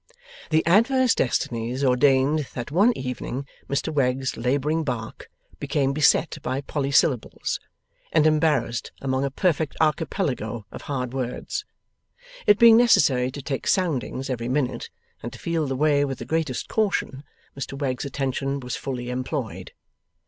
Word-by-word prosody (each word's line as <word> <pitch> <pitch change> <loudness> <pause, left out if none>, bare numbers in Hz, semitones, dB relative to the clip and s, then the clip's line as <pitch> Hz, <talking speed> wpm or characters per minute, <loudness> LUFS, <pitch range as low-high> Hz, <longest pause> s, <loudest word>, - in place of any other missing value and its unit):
The 160 0 +2
adverse 235 +8 +4
destinies 120 +1 -1
ordained 135 +3 +3
that 120 +1 -5
one 200 +9 +4
evening 130 +1 -4 0.2
Mr 140 +3 -1
Wegg's 130 -2 0
labouring 140 +6 0
bark 120 -6 -5 0.3
became 140 -2 0
beset 155 +2 +3
by 130 +1 -2
polysyllables, 140 -3 0 0.5
and 155 - +4
embarrassed 150 -7 +1
among 130 0 -1
a 140 - 0
perfect 160 0 0
archipelago 150 - -1
of - - -8
hard 125 -3 -4
words. 135 - -4 0.8
It 205 - +7
being 230 -1 +8
necessary 140 - +4
to 140 +1 -8
take 135 -1 -3
soundings 145 -7 0
every 120 -2 -3
minute, 130 -1 -1 0.3
and - - -6
to - - -9
feel 165 -3 -1
the 135 - -2
way 145 +1 +3
with 135 -2 -2
the - - -7
greatest 160 -6 -2
caution, 195 -10 -1 0.3
Mr 135 0 -5
Wegg's 130 -3 -2
attention 135 0 -2
was 125 -2 -5
fully 125 -2 -4
employed. 130 -2 -4
140 Hz, 140 wpm, -24 LUFS, 130-155 Hz, 0.8 s, being